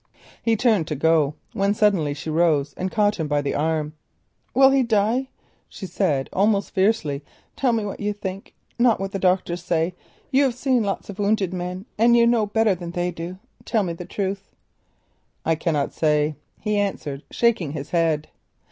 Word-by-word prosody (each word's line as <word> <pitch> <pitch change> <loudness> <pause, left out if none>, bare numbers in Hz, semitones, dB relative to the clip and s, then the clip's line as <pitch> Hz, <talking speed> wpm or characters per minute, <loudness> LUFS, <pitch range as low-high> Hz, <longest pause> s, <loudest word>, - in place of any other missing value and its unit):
He 230 -1 +2
turned 220 -8 +2
to 150 - -2
go, 150 0 +2 0.2
when 200 +1 +1
suddenly 185 -10 +2
she 155 +2 -5
rose 155 -4 +2
and 185 - -2
caught 205 0 +1
him 160 - -1
by 145 0 0
the 140 - -1
arm. 155 0 -1 0.6
"Will 270 +1 +7
he 270 0 +4
die?" 230 +3 +1 0.4
she 195 - -8
said 150 -8 0
almost 200 +1 +2
fiercely. 190 -8 +1 0.3
"Tell 260 -3 +2
me 225 -2 0
what 200 - -5
you 210 0 -1
think—not 205 +4 -2
what 195 0 -3
the 195 - -3
doctors 180 -1 +1
say; 170 0 0 0.4
you 270 +1 +4
have 255 -3 0
seen 255 -1 +1
many 200 -2 0 0.2
wounded 200 -3 +1
men 180 +2 -4
and 235 +1 +5
know 235 -2 +4
better 220 0 +2
than 175 -1 -6
they 175 +1 -2
do. 175 +2 -7 0.3
Tell 220 -3 +1
me 175 -3 -2
the 175 +1 -8
truth." 195 +1 -4 1.0
"I 165 - +3
cannot 155 -3 -1
say," 150 -1 +2 0.3
he 210 -1 0
answered, 150 -8 -2
shaking 215 -11 +1
his 145 -2 -6
head. 160 -3 +1
190 Hz, 175 wpm, -23 LUFS, 160-215 Hz, 1.0 s, Will